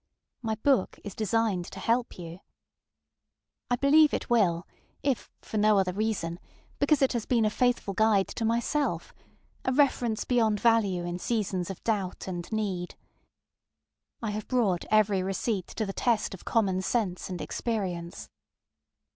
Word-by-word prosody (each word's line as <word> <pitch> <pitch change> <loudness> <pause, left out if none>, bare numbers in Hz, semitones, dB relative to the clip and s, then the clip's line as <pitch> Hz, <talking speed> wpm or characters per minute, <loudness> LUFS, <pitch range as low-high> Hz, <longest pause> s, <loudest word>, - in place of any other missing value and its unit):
My 220 -2 -1
book 250 -1 +1
is 205 - -6
designed 215 -4 0
to - - -9
help 235 +1 0
you. 170 0 -8 1.3
I 245 - +3
believe 295 +4 +5
it - - -5
will, 185 -7 +3 0.4
if 270 -4 0
for 220 - -4
no 210 0 +5
other 185 -2 +1
reason, 195 -5 -2 0.4
because 285 0 +3
it 270 - +3
has 235 -3 -2
been 235 -3 +3
a 215 - +2
faithful 245 -4 +1
guide 210 -1 +3
to 230 - -4
myselfŌĆöa 235 +6 0 0.6
reference 250 -5 +2
beyond 225 -4 +2
value 205 -7 +2
in 175 +1 -4
seasons 195 -5 -1
of 195 - -7
doubt 200 -6 -2
and 175 0 -5
need. 195 -5 -2 1.3
I 220 - -1
have 210 0 -5
brought 215 -9 +1
every 210 -3 +3
receipt 195 +1 -2
to 220 - -3
the 195 - -4
test 230 -3 +1
of 190 - -11
common 195 -5 +1
sense 190 -3 -1
and 180 -2 -4
experience. 185 -7 -3
215 Hz, 145 wpm, -28 LUFS, 185-235 Hz, 1.3 s, believe